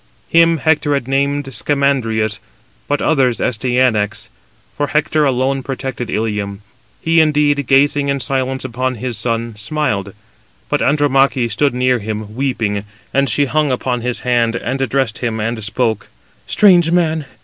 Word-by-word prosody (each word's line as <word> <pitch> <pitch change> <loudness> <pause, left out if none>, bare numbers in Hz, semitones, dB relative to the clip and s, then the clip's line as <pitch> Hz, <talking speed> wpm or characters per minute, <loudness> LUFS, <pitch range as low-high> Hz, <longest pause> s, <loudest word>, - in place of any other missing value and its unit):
Him 165 0 +4
Hector 150 -1 +1
had 140 -3 -3
named 140 +1 0
Scamandrius, 120 -8 0 0.5
but 145 0 -1
others 130 -6 +2
Astyanax; 120 -3 0 0.5
for 145 - -1
Hector 150 +1 +1
alone 135 0 0
protected 130 -3 -5
Ilium. 105 -2 -3 0.4
He 165 0 +4
indeed, 145 -3 +2
gazing 140 +1 +3
in 140 0 0
silence 130 -1 -2
upon 130 +1 -2
his 120 +1 -4
son, 115 -1 -2
smiled. 105 -4 -2 0.5
But - - 0
Andromache 135 -4 +2
stood 140 +4 +1
near 125 0 +2
to - - -11
him, 105 0 -5
weeping, 115 -6 -1 0.3
and 140 0 +2
she 145 - +3
hung 145 +2 0
upon 125 -1 -1
his 125 0 -2
hand, 120 -2 +1
and 135 +2 -3
addressed 130 -3 0
him, 115 -2 -2
and 110 +1 -2
spoke: 110 -1 -1 0.4
"Strange 175 -5 +5
man! 160 -4 +1
130 Hz, 145 wpm, -17 LUFS, 115-145 Hz, 0.5 s, Strange